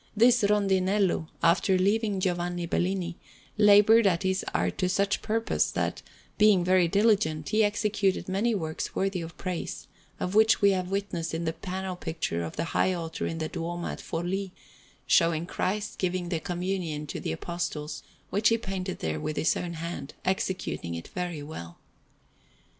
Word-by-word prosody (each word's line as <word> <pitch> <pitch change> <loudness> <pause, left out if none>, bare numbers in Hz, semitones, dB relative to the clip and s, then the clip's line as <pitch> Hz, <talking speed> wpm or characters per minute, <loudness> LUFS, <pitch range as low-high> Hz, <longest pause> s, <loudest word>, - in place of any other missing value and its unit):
This 240 +2 +6
Rondinello, 195 -3 +2 0.2
after 180 +3 +4
leaving 205 +1 +1
Giovanni 175 -1 -1
Bellini, 175 0 -1 0.4
laboured 210 +1 +6
at 180 -1 +1
his 190 0 0
art 90 +2 -1
to 185 - +1
such 200 +2 +1
purpose, 225 +1 0
that, - - -2 0.4
being 210 -4 +6
very 180 -1 +4
diligent, 190 -6 +2
he 215 +1 +3
executed 205 -2 0
many 210 +5 +1
works 160 -4 -4
worthy 195 -2 0
of 165 0 -8
praise; 180 -3 -4 0.3
of 180 - -2
which 220 +1 +5
we 200 -1 +5
have 185 -1 -1
witness 195 -5 -2
in 170 +1 -3
the 160 - 0
panel 190 +1 -4
picture 160 - -3
of 80 - -6
the - - -1
high 185 - +3
altar 165 -2 -4
in 165 - -4
the 160 -1 -2
Duomo 170 +2 -4
at - - -5
Forlì, 185 +4 -3 0.6
showing 165 -1 +3
Christ 205 +4 -2
giving 180 -1 -1
the 170 -3 -1
Communion 175 -3 -3
to 145 - -5
the - - -3
Apostles, 155 - -4 0.3
which 210 +3 +3
he 230 - +3
painted 190 -4 -4
there 80 -1 -2
with 150 - -4
his - - +2
own 175 -1 -4
hand, 165 -4 -6
executing 185 - -2
it 85 - -7
very 175 -4 -4
well. 85 - -8
185 Hz, 165 wpm, -28 LUFS, 165-200 Hz, 0.6 s, This